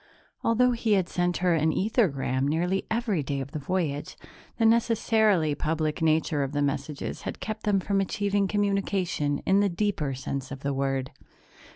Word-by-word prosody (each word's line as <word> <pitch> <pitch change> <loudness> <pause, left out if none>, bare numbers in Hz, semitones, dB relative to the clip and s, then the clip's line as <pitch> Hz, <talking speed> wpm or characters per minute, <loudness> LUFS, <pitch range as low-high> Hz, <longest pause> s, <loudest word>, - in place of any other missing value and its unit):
Although 250 +2 +3
he 230 -2 +1
had 190 -3 +2
sent 175 -1 0
her 175 - +4
an 160 0 +2
ethergram 140 - +1
nearly 175 +5 0
every 220 -7 0
day 140 0 -3
of 135 +1 -6
the 155 - -4
voyage, 150 -2 -2 0.4
the 225 - +2
necessarily 220 -7 +3
public 155 +1 -1
nature 155 -1 +2
of 135 0 -2
the 145 - 0
messages 140 +1 -3
had - - -6
kept 215 0 -5
them 205 -2 +3
from 195 +1 0
achieving 200 +1 0
communication 195 -7 0
in 195 +1 +4
the 200 0 +3
deeper 170 -7 -1
sense 135 0 -4
of 135 -1 -7
the 140 0 -1
word. 135 -1 -1
175 Hz, 170 wpm, -27 LUFS, 145-205 Hz, 0.4 s, her